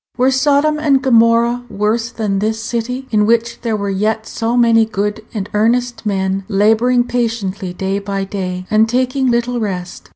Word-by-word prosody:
Were 260 Hz, +1 st, +3 dB
Sodom 290 Hz, +3 st, +2 dB
and 280 Hz, -3 st, +3 dB
Gomorrah 235 Hz, -1 st, +3 dB
worse 220 Hz, +3 st, -1 dB
than 210 Hz, -5 st, -2 dB
this 220 Hz, +2 st, -1 dB
city, 240 Hz, +3 st, -4 dB
in 210 Hz, -1 st, +2 dB
which 235 Hz, +1 st, 0 dB
there 225 Hz, -3 st, -1 dB
were 200 Hz, -1 st, -2 dB
yet 215 Hz, +3 st, -1 dB
so 230 Hz, +2 st, -2 dB
many 230 Hz, -2 st, +5 dB
good 210 Hz, 0 st, -3 dB
and 205 Hz, -3 st, -4 dB
earnest 235 Hz, +2 st, 0 dB
men 195 Hz, -1 st, -1 dB
laboring 225 Hz, +4 st, +3 dB
patiently 225 Hz, -6 st, -2 dB
day 190 Hz, +2 st, -2 dB
by 200 Hz, -1 st, -3 dB
day, 185 Hz, -2 st, -4 dB
and 220 Hz, +1 st, +3 dB
taking 255 Hz, +2 st, 0 dB
little 240 Hz, 0 st, 0 dB
rest? 180 Hz, -, -5 dB
225 Hz, 165 wpm, -16 LUFS, 200-245 Hz, -, many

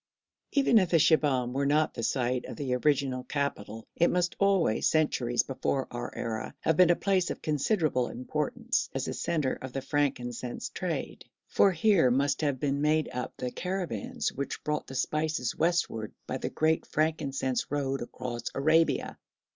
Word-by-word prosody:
Even 270 Hz, -5 st, +5 dB
if 185 Hz, -3 st, +1 dB
Shibahm 150 Hz, -7 st, +3 dB
were 140 Hz, +1 st, 0 dB
not 150 Hz, +2 st, +2 dB
the -, -, -5 dB
site 125 Hz, +1 st, 0 dB
of -, -, -7 dB
the 135 Hz, -4 st, -2 dB
original 130 Hz, -1 st, +1 dB
capital 115 Hz, -7 st, -3 dB
it 170 Hz, -, +3 dB
must 175 Hz, -1 st, 0 dB
always, 195 Hz, -, +3 dB
centuries 130 Hz, -6 st, +1 dB
before 135 Hz, 0 st, -2 dB
our 120 Hz, 0 st, -5 dB
era, 110 Hz, -1 st, -4 dB
have 160 Hz, -, +2 dB
been 180 Hz, +1 st, +6 dB
a 175 Hz, -, +5 dB
place 190 Hz, -1 st, +1 dB
of -, -, -5 dB
considerable 150 Hz, -, +1 dB
importance 145 Hz, +4 st, -2 dB
as -, -, -1 dB
the -, -, -3 dB
centre 155 Hz, -6 st, -1 dB
of 130 Hz, -1 st, -7 dB
the 135 Hz, -, -2 dB
frankincense 125 Hz, -4 st, -2 dB
trade, -, -, -4 dB, 0.2 s
for 195 Hz, -, +4 dB
here 180 Hz, -5 st, +4 dB
must 140 Hz, +4 st, +1 dB
have 140 Hz, -4 st, 0 dB
been 140 Hz, 0 st, 0 dB
made 155 Hz, 0 st, +2 dB
up 125 Hz, 0 st, -4 dB
the 125 Hz, -1 st, -3 dB
caravans 180 Hz, -, -3 dB
which 140 Hz, +1 st, -4 dB
brought 150 Hz, 0 st, -2 dB
the 135 Hz, -, -8 dB
spices 155 Hz, -1 st, -1 dB
westward 165 Hz, -10 st, 0 dB
by -, -, -3 dB
the -, -, -3 dB
great 160 Hz, 0 st, +1 dB
frankincense 140 Hz, -4 st, -1 dB
road 135 Hz, -1 st, -1 dB
across 120 Hz, 0 st, -6 dB
Arabia. 155 Hz, +4 st, +2 dB
140 Hz, 165 wpm, -29 LUFS, 125-160 Hz, 0.2 s, been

